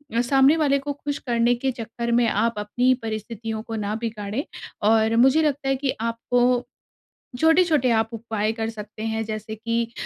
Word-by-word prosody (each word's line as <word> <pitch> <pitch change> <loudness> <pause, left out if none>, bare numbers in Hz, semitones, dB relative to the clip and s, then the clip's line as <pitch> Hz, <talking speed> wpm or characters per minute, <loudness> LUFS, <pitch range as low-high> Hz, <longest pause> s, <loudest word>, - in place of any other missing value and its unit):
अ, 235 - +3
सामने 270 +5 +4
वाले 280 -3 +2
को 285 +1 -4
खुश 285 0 -4
करने 235 0 +2
के 260 +2 -1
चक्कर 235 0 -5
में 235 0 +3
आप 230 +3 0
अपनी 210 +4 -2
ही 255 - +6
परिस्थितियों 220 0 -4
को 225 -1 -6
ना 210 0 -2
बिगाड़ें 220 +2 -3 0.5
और 220 0 +3
मुझे 265 +6 +5
लगता 285 -2 0
है 270 - +2
कि 265 0 -1
आपको 245 +2 +1 0.7
छोटे-छोटे 320 -4 +4
आप 225 0 +2
उपाय 220 -1 -2
कर 225 -1 -2
सकते 215 0 -9
हैं, 225 0 -2
जैसे 215 0 -5
कि 230 +1 -2
230 Hz, 180 wpm, -23 LUFS, 220-265 Hz, 0.7 s, ही